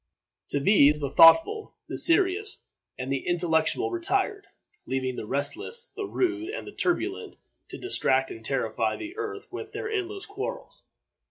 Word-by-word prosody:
To 145 - 0
these 150 -2 +5
the 140 -2 -3
thoughtful, 330 - +6
the - - -5
serious, 385 +4 +2 0.3
and 130 +1 -4
the 135 -1 -2
intellectual 175 - +1
retired, 395 +4 -1 0.4
leaving 130 -1 -2
the 105 - -6
restless, 145 - -2
the 410 -2 -4
rude, 350 -2 -1
and 430 - -5
the - - -8
turbulent 350 - -1 0.3
to - - -8
distract 135 - +1
and 110 - -9
terrify 115 -3 -1
the 330 +3 -8
earth 425 -2 -5
with - - -7
their 440 - -4
endless 395 -1 -3
quarrels. 460 +5 -7
340 Hz, 150 wpm, -26 LUFS, -, 0.4 s, thoughtful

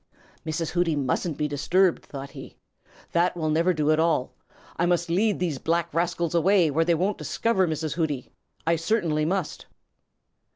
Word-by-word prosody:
"Mrs. 160 +1 -2
Hooty 175 -3 +1
mustn't 145 +3 -1
be 150 - 0
disturbed," 175 +5 +1
thought 140 -1 -8
he. - - -11 0.5
"That 175 +1 +1
will 155 -2 -1
never 165 +4 +3
do 155 -3 +1
at 155 - +2
all. 160 -6 +1 0.4
I 170 - +1
must 175 -1 +1
lead 205 +4 +2
these 165 -7 -2
black 170 +2 -1
rascals 170 0 0
away 175 -1 +3
where 160 +4 +2
they 170 0 +3
won't 190 +5 -1
discover 195 -5 +1
Mrs. 155 -1 -2
Hooty. 150 -6 -2 0.3
I 165 +1 +2
certainly 165 -4 0
must." 185 -1 -2
165 Hz, 165 wpm, -25 LUFS, 155-175 Hz, 0.5 s, never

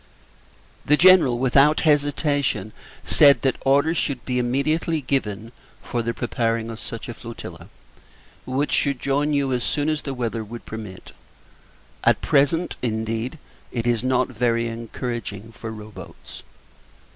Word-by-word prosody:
The 150 - +3
General, 175 -9 +6
without 135 +4 +4
hesitation, 145 -7 +1 0.3
said 140 -5 +5
that 135 - +1
orders 145 +5 +3
should 135 -5 -2
be 125 -1 0
immediately 155 +6 0
given 115 -5 -2 0.3
for 120 - -2
the 115 +1 -1
preparing 115 -1 -1
of 115 - -8
such 115 +3 -7
a 120 - -5
flotilla, 115 +1 -10 0.8
which 135 +3 -1
should 140 -3 +1
join 140 +3 0
you 140 -2 +1
as 125 -1 -1
soon 150 0 0
as 155 -1 -1
the 135 -2 -5
weather 115 -2 -2
would 115 +2 -9
permit. 105 -4 -8 0.9
At - - +4
present, 145 +5 +1
indeed, 115 +3 -2 0.3
it 115 -2 -3
is 120 -1 +1
not 130 -1 +1
very 115 -1 0
encouraging 115 -2 -5
for 115 0 -8
row 110 -1 -9
boats. - - -11
125 Hz, 140 wpm, -23 LUFS, 115-140 Hz, 0.9 s, General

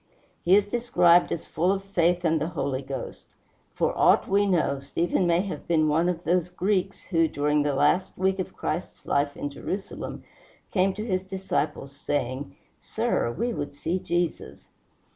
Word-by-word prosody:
He 180 +3 +5
is 205 0 +4
described 180 -7 +3
as 165 - -3
full 175 +4 +1
of 195 0 -1
faith 180 -2 +1
and 160 -2 +2
the 155 - 0
Holy 140 -5 -2
Ghost. 135 0 -7 0.5
For - - 0
aught - - +4
we 200 +1 +3
know, 160 -7 +1
Stephen 170 +6 0
may 170 +1 +3
have 195 -1 -6
been 155 -2 +3
one 165 +4 +2
of 175 -1 -3
those 180 +2 +1
Greeks 190 +1 -1
who, 165 -3 +2
during 150 0 +1
the 145 -1 0
last 150 +7 +2
week 190 +1 +1
of 185 - -4
Christ's 170 +4 -4
life 145 0 0
in 145 - -4
Jerusalem, 190 +7 -5 0.5
came 190 0 +2
to 210 +2 -4
his 185 -4 -1
disciples, 190 -7 -3
saying, 130 -6 -3 0.2
"Sir, 115 - -1
we 235 - -2
would 145 -5 -5
see 165 +5 -2
Jesus." 175 -2 -3
175 Hz, 170 wpm, -26 LUFS, 150-190 Hz, 0.5 s, He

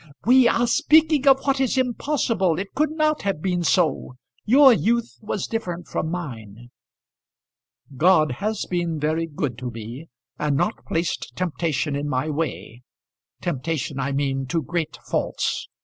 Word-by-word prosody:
"We 250 +1 +6
are 235 +1 +2
speaking 310 +2 +3
of 270 0 +6
what 275 -1 0
is 265 0 +1
impossible. 240 - 0
It 195 +2 -5
could 305 +1 +1
not 310 -1 0
have 195 -5 -1
been 180 +1 -1
so. 165 -6 +1 0.3
Your 265 +3 +7
youth 235 +1 0
was 210 -3 -3
different 175 -7 -4
from 160 - -3
mine." 120 - -7 1.2
"God 155 0 +4
has 215 0 -1
been 170 -3 -2
very 155 +2 0
good 145 -6 -4
to 125 -1 -4
me, 115 +7 -8 0.3
and 150 -2 0
not 210 - -1
placed 165 +1 -2
temptation 160 -5 -1
in 145 +1 -3
my 130 +3 -1
way; 145 -6 -4 0.6
temptation, 155 -2 -3
I 135 +1 -1
mean, 135 -1 -1
to 165 +2 -1
great 170 +3 -3
faults. - - -2
170 Hz, 150 wpm, -23 LUFS, 145-230 Hz, 1.2 s, Your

